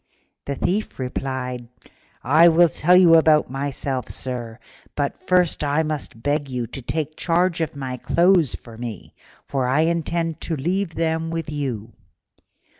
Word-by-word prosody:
The 140 - -3
Thief 200 +9 -2
replied, 125 -1 -4 0.6
"I 155 +6 +6
will 170 +1 +5
tell 175 +5 +3
you 170 -3 +7
about 155 -4 +4
myself, 135 -1 -3
sir, 120 -3 -5 0.4
but 140 -1 -1
first 180 -4 +1
I 145 +2 +1
must 150 -7 -5
beg 145 0 0
you 125 -2 -3
to 135 - -8
take 155 +4 -3
charge 170 0 +1
of 160 -1 -2
my 130 -2 -5
clothes 170 +1 +3
for 115 -2 -13
me, 115 -5 -7 0.3
for 130 -2 -1
I 135 +5 +2
intend 165 0 -1
to 165 - -2
leave 175 +4 -2
them 160 0 -1
with 165 -2 -4
you. 125 -7 -4
150 Hz, 150 wpm, -22 LUFS, 130-165 Hz, 0.6 s, you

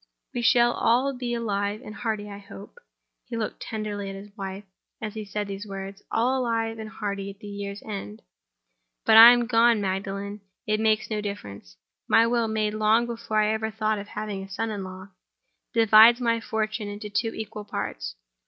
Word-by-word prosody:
We 240 - -2
shall 240 0 +4
all 255 +4 +2
be 245 -2 -3
alive 205 -1 -2
and 210 - -8
hearty, 215 -1 -3
I 200 -1 -8
hope"—he 230 - -12
looked 220 -2 -4
tenderly 210 -2 -4
at 195 - -6
his 200 +1 -11
wife 195 -1 -6 0.4
as 215 -1 -5
he 220 -1 -5
said 205 0 -4
those 200 +1 -6
words—"all 200 +6 -2
alive 225 -2 -1
and 215 -1 -6
hearty 200 -2 -4
at 195 - -10
the 210 - -13
year's 200 0 -6
end. 155 - -7 0.8
But - - +3
if 220 - +9
I 230 +1 +12
am 240 -1 +3
gone, 230 -1 +4
Magdalen, 200 +1 -3 0.2
it 215 0 +1
will - - -1
make 220 0 +2
no 210 -1 -1
difference. 100 - -7 0.3
My 225 0 +5
will—made 220 -3 0
long 215 +2 +3
before 230 -2 -3
I 210 +1 +2
ever 220 0 -2
thought 215 -1 -1
of 205 - -8
having 210 -2 -5
a 195 - -9
son 220 +3 -3
in 205 -2 -4
law 185 +1 -9 0.6
divides 225 +1 +7
my 230 -2 +1
fortune 220 -1 -2
into 205 0 -7
two 225 +2 0
equal 215 -1 -6
parts. - - -4
215 Hz, 185 wpm, -26 LUFS, 200-225 Hz, 0.8 s, I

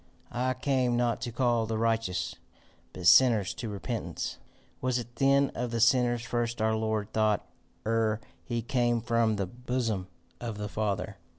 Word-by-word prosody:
"I 130 +1 0
came 130 -2 +1
not 120 -1 +1
to 120 - -3
call 120 -2 +1
the 110 0 -1
righteous, 115 -4 0 0.6
but 90 - -8
sinners 115 -4 +6
to 115 - -5
repentance." 105 -3 -4 0.4
"Was 130 -1 +1
it 120 0 -7
then 140 0 +4
of 120 +1 -2
the 115 0 -2
sinners 120 0 +3
first 120 0 -2
our 110 0 +2
Lord 110 -1 -1
thought 110 -2 +2 0.4
ere 110 -1 +1 0.2
he 120 -2 -3
came 120 -1 +1
from 115 -1 +2
the 100 -1 -1
bosom 115 -2 -2 0.3
of 115 -3 -5
the 105 0 -4
Father? 105 -1 -2
115 Hz, 160 wpm, -29 LUFS, 110-120 Hz, 0.6 s, sinners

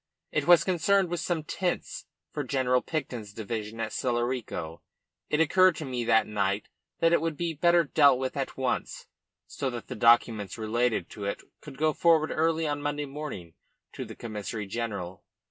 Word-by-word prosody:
It - - -1
was 175 -1 +7
concerned 190 +1 +2
with 175 0 -2
some 170 -1 -1
tents 180 +3 -3 0.2
for 145 - -3
General 125 -2 +1
Picton's 125 -9 -4
division 110 0 -5
at 110 -1 -2
Celorico. 120 -9 -2 0.5
It 150 - +1
occurred 185 +2 +5
to 155 - -5
me 125 -2 -3
that 110 - +4
night 100 -1 -1 0.3
that 165 0 +4
it 170 - +4
would 165 -2 -2
be 170 -1 -2
better 170 +2 +4
dealt 145 -3 +5
with 130 0 -3
at 135 -2 -3
once, 130 -1 -2 0.4
so 135 - -3
that 120 -2 -7
the - - -4
documents 115 -3 +3
relating 115 +2 0
to 105 - -8
it 100 - -3 0.2
could 140 -3 -11
go 155 +1 +2
forward 160 -1 +3
early 160 0 +1
on 145 -1 -2
Monday 145 0 -2
morning 135 - -7 0.4
to - - -5
the - - -9
Commissary 105 -1 -5
General. 100 -4 -5
130 Hz, 175 wpm, -28 LUFS, 110-160 Hz, 0.5 s, was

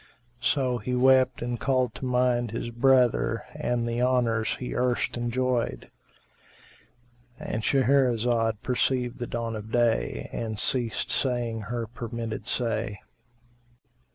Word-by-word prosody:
So 125 -1 +1
he 125 +4 -2
wept 130 -1 +4
and 120 -1 -3
called 130 -3 +1
to - - -6
mind 125 -1 +1
his 115 +2 -4
brother 120 -2 +3
and 120 -1 -1
the 115 +1 -1
honours 120 -4 +1
he 125 - -5
erst 125 -1 0
enjoyed.—And 120 -1 -6
Shahrazad 120 -4 +2
perceived 125 -1 0
the 120 - -3
dawn 115 -1 -3
of 110 +1 -7
day 115 - +1
and 110 -2 -3
ceased 120 +1 0
saying 120 -4 0
her 120 -1 -2
permitted 115 -1 -6
say. 115 -4 -1
120 Hz, 115 wpm, -27 LUFS, 115-125 Hz, -, wept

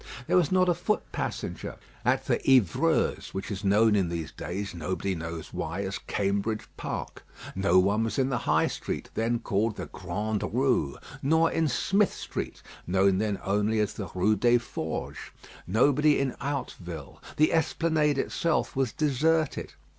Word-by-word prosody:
There - - +1
was 180 -3 +3
not 185 0 +4
a 175 - +4
foot 175 +5 -1
passenger - - -4 0.3
at - - +2
the - - +2
"Hyvreuse," 125 -9 +2
which 95 - -4
is 100 +1 -4
known 105 +2 +4
in 95 -4 +2
these 85 -3 -4
days, 95 +3 -5
nobody 90 +3 -2
knows 85 -1 -6
why, 100 - -3
as 95 0 -3
Cambridge 100 +2 -1
Park; - - -5 0.3
no 95 -1 +3
one 100 +4 +3
was 110 -1 -3
in 135 -1 +2
the 125 -3 0
High - - +4
Street, - - -4
then 115 +2 +1
called 110 -1 0
the - - -5
Grande 105 +4 -3
Rue; 125 - +1 0.2
nor 160 +4 +3
in 165 -1 +1
Smith 195 - +2
Street, - - -5 0.2
known 95 +1 +3
then 105 -2 -1
only 105 +3 +1
as 105 -1 0
the 100 -5 -6
Rue 105 +4 +3
des 120 +4 +4
Forges; 115 -8 -4 0.5
nobody 145 +9 +4
in 135 -2 -1
Hauteville. 90 - -5 0.2
The 155 - +4
Esplanade 160 -2 +2
itself 165 +3 0
was 130 -3 +1
deserted. 155 +1 +1
110 Hz, 160 wpm, -28 LUFS, 95-140 Hz, 0.5 s, not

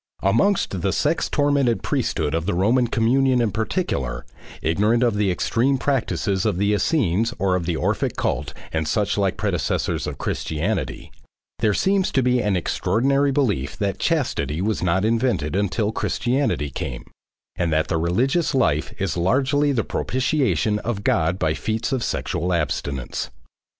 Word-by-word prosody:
Amongst 100 - +2
the - - +1
sex - - 0
tormented 140 -5 +1
priesthood 75 - -1
of 80 +2 -1
the 105 - 0
Roman 115 +7 +3
communion 125 +3 +2
in 115 -3 +1
particular, 110 - -2 0.4
ignorant 105 +9 +2
of 120 -3 +3
the 105 -1 +1
extreme 120 +9 +1
practices 115 -8 0
of 105 -5 0
the 100 +2 +2
Essenes 115 - +1
and 95 -1 +2
of 85 -2 -2
the 85 - 0
Orphic - - -1
cult 70 +2 -1 0.2
and 80 -1 -1
suchlike 100 +1 0
predecessors 90 - -1
of - - -5
Christianity, 80 - -3 0.5
there 105 -2 +2
seems 195 -1 +1
to 130 - +2
be 125 0 +2
an 105 -3 +1
extraordinary 135 +11 +1
belief 105 - 0
that 100 -3 -2
chastity 75 +2 0
was 105 +3 -1
not 90 +3 +1
invented 115 - 0
until 105 +2 0
Christianity 120 - -1
came, 60 -1 -5 0.5
and 85 -1 -1
that 80 +1 +1
the 80 - 0
religious 135 - +1
life 75 - +1
is 95 -3 -1
largely 135 - +2
the 120 -5 0
propitiation 125 - 0
of 105 -2 -3
God 80 0 +1
by 80 -4 +1
feats 110 +7 -2
of 130 -3 0
sexual 90 0 -2
abstinence. 70 -5 -2
105 Hz, 150 wpm, -22 LUFS, 85-125 Hz, 0.5 s, Roman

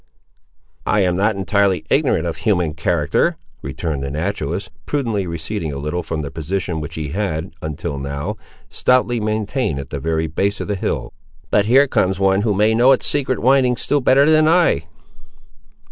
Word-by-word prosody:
"I 105 - +3
am 90 -2 +2
not 105 +3 +1
entirely 100 -1 +1
ignorant 80 - +2
of 85 - -3
human 90 -8 0
character," 75 - 0 0.2
returned 80 -5 -4
the 70 - -3
naturalist, 85 +4 -3 0.2
prudently 115 -10 -1
receding 85 +1 -4
a 70 - -5
little 75 +5 -3
from 80 -2 -4
the 70 - -6
position, 85 0 -3
which 75 +2 -7
he 75 -2 -4
had, 90 -2 -3
until 75 -1 -4
now, 70 +1 -4 0.3
stoutly 125 -1 +1
maintained 110 - -1
at 70 0 -8
the 70 - -3
very 80 +2 -1
base 100 +6 -1
of - - -4
the 105 - 0
hill. 95 - -3 0.4
"But 105 0 +3
here 135 +5 +6
comes 95 -6 +1
one 95 0 +3
who 105 -2 +1
may 105 +3 +3
know 125 +4 +5
its 130 - -1
secret 135 -3 0
windings 130 -1 +2
still 145 -1 +1
better 135 +3 +4
than 155 0 +5
I." 165 - +3
95 Hz, 175 wpm, -19 LUFS, 80-110 Hz, 0.4 s, here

